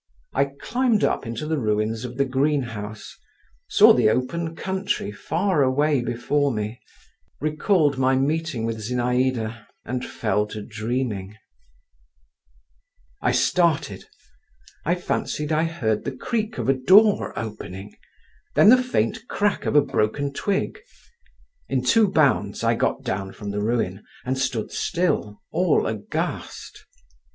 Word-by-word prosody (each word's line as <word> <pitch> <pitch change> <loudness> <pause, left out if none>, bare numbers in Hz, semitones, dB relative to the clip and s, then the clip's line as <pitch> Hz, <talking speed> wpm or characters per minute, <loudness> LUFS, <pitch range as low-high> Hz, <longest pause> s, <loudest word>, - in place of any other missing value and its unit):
I - - +3
climbed 220 - 0
up - - 0
into 115 +5 -4
the 155 -1 -1
ruins 110 0 -1
of 125 0 -7
the 140 - +2
greenhouse, 125 -6 -2 0.5
saw - - +7
the - - +4
open 160 +8 -1
country 190 - -2
far 170 - 0
away 140 +1 +2
before 120 +4 0
me, 110 +1 -4 0.6
recalled 155 -1 +1
my 130 0 +3
meeting 145 -3 -1
with 115 -1 -3
Zinaïda, 120 -1 -1 0.2
and 125 0 -3
fell 105 -3 -1
to 105 0 -7
dreaming…. 110 -2 -3 1.8
I - - +2
started…. 160 - +1 0.8
I 170 +3 +2
fancied 150 -3 -2
I 155 +1 +2
heard 115 -11 -1
the 135 -2 -5
creak 220 - -2
of - - -2
a 135 - +5
door 195 - +4
opening, 100 -2 -7 0.6
then - - +7
the 255 +2 +7
faint 245 -2 -1
crack 205 0 0
of - - 0
a 145 - +7
broken 140 +3 -1
twig. 200 - -1 0.9
In 130 -2 0
two 215 - +4
bounds 155 -7 +1
I - - +3
got - - -1
down 95 0 -3
from 100 -1 -6
the 105 0 -2
ruin, 105 -3 -1 0.2
and 130 +1 0
stood 130 -4 -2
still, 170 - -1
all 175 -1 +2
aghast. 110 -2 -5
130 Hz, 130 wpm, -23 LUFS, 110-160 Hz, 1.8 s, saw